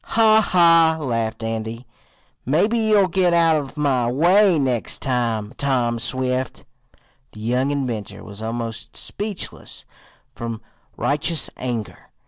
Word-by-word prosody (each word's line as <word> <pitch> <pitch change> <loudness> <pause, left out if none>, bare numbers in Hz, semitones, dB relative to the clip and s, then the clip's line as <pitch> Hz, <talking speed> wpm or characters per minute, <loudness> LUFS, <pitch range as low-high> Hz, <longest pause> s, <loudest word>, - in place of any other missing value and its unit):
"Ha! 220 -1 +4
ha!" 165 -4 +4
laughed 115 -5 -2
Andy. 115 +2 -4 0.6
"Maybe 175 - +1
you'll 215 -3 +3
get 180 -1 +2
out 165 -1 +4
of 145 0 -6
my 130 -5 +1
way 180 +6 +4
next 130 -5 0
time, 115 -4 -1
Tom 125 -4 0
Swift." 130 +1 -2 0.7
The - - -12
young 125 +5 0
inventor 120 -8 -4
was 100 +1 -10
almost 115 -1 -5
speechless 205 -2 -5 0.5
from 115 -1 -5 0.4
righteous 150 +2 +1
anger. 120 -4 -5
130 Hz, 115 wpm, -21 LUFS, 115-165 Hz, 0.7 s, Ha